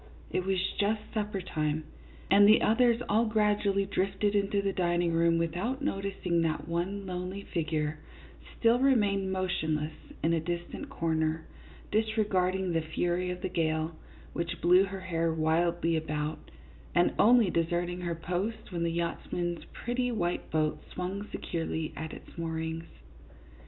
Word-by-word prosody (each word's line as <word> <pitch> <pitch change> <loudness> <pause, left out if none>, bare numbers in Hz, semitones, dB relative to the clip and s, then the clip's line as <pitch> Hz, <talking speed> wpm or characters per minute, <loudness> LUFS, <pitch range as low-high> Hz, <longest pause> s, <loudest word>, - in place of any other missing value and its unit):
It 185 - -1
was 195 -1 +2 0.2
just 210 +1 +2
supper 210 -3 -2
time, 155 -3 -1 0.5
and 200 +1 +8
the 215 - +6
others 235 +1 +4
all 220 +3 +3
gradually 210 -2 +2
drifted 195 +1 0
into 200 0 +1
the 200 -1 0
dining 175 -2 +1
room 165 0 +3
without 185 - -1
noticing 195 - 0
that 155 -2 -1
one 180 +4 -2
lonely 185 +2 -4
figure 155 -3 -2 0.6
still 230 +1 +4
remained 205 -8 +3
motionless 160 -5 -1 0.3
in 165 - +3
a 165 - +2
dis 170 +2 -2
tant 290 - -7
corner, 160 -7 0 0.5
disregarding 200 -4 +1
the 165 - +2
fury 175 +3 -1
of 180 0 -5
the - - +1
gale, 160 -2 0 0.4
which 170 0 -3
blew 180 +3 +6
her 195 -1 -6
hair 165 -3 0
wildly 165 +1 +1
about, 150 -1 -3 0.5
and 175 0 +4
only 230 -4 +6
deserting 175 +2 0
her 170 -1 -2
post 180 +7 -3
when 170 -2 -3
the 170 - +1
yachtsman's 170 0 -2
pretty 245 +1 -2
white 175 -6 -1
boat 155 -1 0
swung 190 +3 -4
securely 160 -1 -3
at 160 0 -5
its - - -11
moorings. 160 0 -3
180 Hz, 145 wpm, -30 LUFS, 165-200 Hz, 0.6 s, and